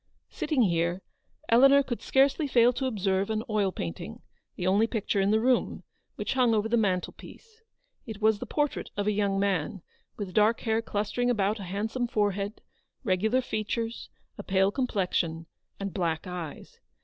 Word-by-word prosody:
Sitting 280 -6 +1
here, 175 0 0 0.4
Eleanor 275 +4 +6
could 240 -3 -4
scarcely 275 +3 +2
fail 245 -2 +4
to 265 +2 -2
observe 195 -4 0
an 220 0 -1
oil 210 -4 +1
painting 85 - -6
— - - -48
the 180 - -4
only 200 +4 +3
picture 210 -3 -1
in 195 - +2
the 215 +1 +3
room 250 +2 +1 0.2
— - - -49
which - - -2
hung 250 -3 +3
over 210 +1 +1
the 230 - +1
mantelpiece. 225 - -3 0.5
It 220 -2 -7
was 220 -1 +3
the - - -6
portrait 295 -1 -1
of 205 - -1
a 210 - +2
young 200 -1 0
man, 195 -1 -1 0.3
with 195 -4 -5
dark 215 +2 +3
hair 225 -1 0
clus 210 -2 -3
tering 245 0 +1
about 210 -2 +1
a 195 - -6
handsome 220 +7 -2
forehead, 205 -1 -1 0.4
regular 220 +4 +1
features, 225 0 -3 0.3
a - - -5
pale 195 +1 +2
complexion, 180 - -1 0.3
and 195 -1 -4
black 165 -4 -1
eyes. 180 -4 -7
210 Hz, 175 wpm, -28 LUFS, 195-235 Hz, 0.5 s, Eleanor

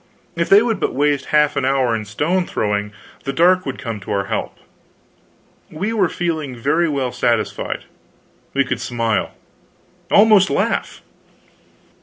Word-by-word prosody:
If 170 0 -1
they 205 +3 +7
would 225 -4 -1
but - - -1
waste 145 0 +1
half 150 -1 +2
an - - 0
hour 130 -3 +1
in 110 -1 -4
stone 170 - -1
throwing, 105 0 -2 0.3
the 135 - -2
dark 180 +4 +3
would 135 - -4
come 115 -5 -5
to 95 - -8
our 100 -1 0
help. - - -4 1.1
We 195 +8 -3
were 195 -6 +2
feeling 160 -7 -3
very 150 +8 +1
well 135 -4 -1
satisfied. 115 -3 -1 0.7
We 140 0 +3
could - - -3
smile; 115 -3 -1 0.7
almost 205 -2 +5
laugh. - - -1
145 Hz, 145 wpm, -19 LUFS, 120-175 Hz, 1.1 s, they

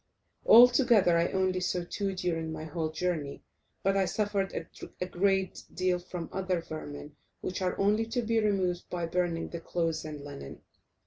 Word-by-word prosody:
Altogether 240 -6 +7
I 170 +1 +3
only 185 -1 +1
saw 180 -1 -1
two 195 0 -2
during 165 -3 -2
my 155 0 -5
whole 160 0 -3
journey, 155 -3 -3 0.4
but 195 +1 +2
I 195 -1 +3
suffered 200 0 -1 0.3
a 180 - -1
great 190 +1 0
deal 185 -1 +1
from 175 -1 -6
other 185 -2 -1
vermin, 150 -2 -8 0.3
which 185 - -4
are 180 -1 -1
only 210 +3 +2
to 240 +1 -1
be 225 0 +2
removed 190 -5 0
by 175 -1 -2
burning 170 -1 -1
the 170 - -5
clothes 165 -2 -1
and 150 -2 -7
linen. 140 - -9
180 Hz, 165 wpm, -30 LUFS, 165-195 Hz, 0.4 s, Altogether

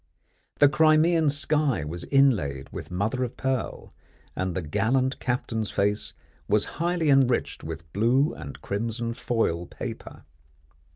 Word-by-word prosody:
The 145 - +7
Crimean 155 +1 +4
sky 145 - +1
was 85 +3 -5
inlaid 100 - +2
with - - -7
mother 105 +8 -1
of 125 - -5
pearl, 130 -2 -3 0.4
and 95 -2 -2
the 95 - -2
gallant 130 - 0
captain's 115 -3 -2
face 105 +1 0 0.3
was 105 0 +3 0.2
highly 170 -3 +2
enriched 130 -3 +2
with 80 -1 -8
blue 120 +8 +2
and 70 -2 -9
crimson 115 +3 -2
foil 100 -8 -1
paper. - - -8
115 Hz, 125 wpm, -26 LUFS, 95-140 Hz, 0.4 s, The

